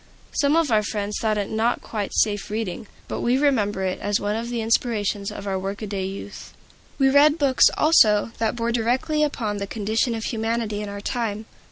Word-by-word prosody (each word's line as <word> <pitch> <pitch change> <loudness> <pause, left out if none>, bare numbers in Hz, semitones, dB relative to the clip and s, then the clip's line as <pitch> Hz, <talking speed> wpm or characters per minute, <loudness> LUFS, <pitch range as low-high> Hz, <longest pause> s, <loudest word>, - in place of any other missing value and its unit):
Some 285 +1 +2
of 325 -5 +2
our 215 -1 +4
friends 205 0 -3
thought 215 -1 +1
it 205 -1 -3
not 225 +2 0
quite 210 -3 -4
safe 205 -2 +1
reading; 215 -2 -4 0.2
but - - -4
we 245 +2 +2
remember 215 -9 +1
it 185 -1 -2
as 205 0 0
one 205 +1 -1
of 230 +1 -4
the 240 -1 -2
inspirations 220 -3 0
of 200 - -8
our 190 -1 -1
workaday 195 0 -4
youth. 195 +1 -8 0.4
We 270 - +4
read 290 +2 +5
books, 275 -4 +4
also, 225 -9 +4
that 225 0 0
bore 235 0 -1
directly 245 +6 0
upon 230 -8 -1
the 200 0 -4
condition 220 +3 -1
of 225 - -5
humanity 225 -2 -2
in 210 - -5
our 200 0 -6
time. 220 -2 -3
220 Hz, 195 wpm, -23 LUFS, 205-240 Hz, 0.4 s, read